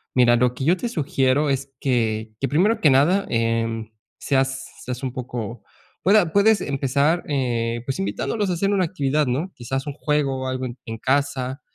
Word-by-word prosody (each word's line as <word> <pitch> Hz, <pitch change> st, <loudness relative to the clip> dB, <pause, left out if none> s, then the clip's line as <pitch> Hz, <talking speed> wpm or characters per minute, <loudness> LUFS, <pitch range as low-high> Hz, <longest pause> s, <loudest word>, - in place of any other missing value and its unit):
mira, 120 Hz, -1 st, +5 dB
lo 125 Hz, 0 st, +2 dB
que 130 Hz, -, -5 dB
yo 170 Hz, +6 st, +3 dB
te 240 Hz, -, -3 dB
sugiero 145 Hz, -, +1 dB
es 135 Hz, 0 st, -2 dB
que, 110 Hz, -4 st, 0 dB
que, 135 Hz, -, 0 dB
primero 200 Hz, +11 st, +2 dB
que 155 Hz, -, +5 dB
nada, 150 Hz, +9 st, +4 dB
em, 115 Hz, -1 st, -1 dB, 0.3 s
seas 135 Hz, -1 st, 0 dB, 0.2 s
seas 125 Hz, +1 st, -5 dB
un 130 Hz, -, -2 dB
poco, 120 Hz, -3 st, -6 dB, 0.4 s
pue 200 Hz, +3 st, +5 dB
a 175 Hz, -6 st, +2 dB
puedes 200 Hz, +2 st, +4 dB
empezar, 140 Hz, +4 st, +1 dB
eh, 120 Hz, -4 st, -1 dB
pues, 135 Hz, 0 st, -3 dB
invitándolos 105 Hz, -, -1 dB
a -, -, +1 dB
hacer 195 Hz, +4 st, 0 dB
una 195 Hz, -3 st, +2 dB
actividad, 150 Hz, -3 st, 0 dB
¿no?, 145 Hz, +10 st, -1 dB
quizás 135 Hz, +3 st, -4 dB
un 145 Hz, -, -3 dB
juego 140 Hz, -3 st, -1 dB
o -, -, -3 dB
algo 130 Hz, 0 st, -2 dB
en 120 Hz, 0 st, -6 dB
en 115 Hz, -1 st, -5 dB
casa, 135 Hz, 0 st, -1 dB
135 Hz, 190 wpm, -23 LUFS, 125-150 Hz, 0.4 s, mira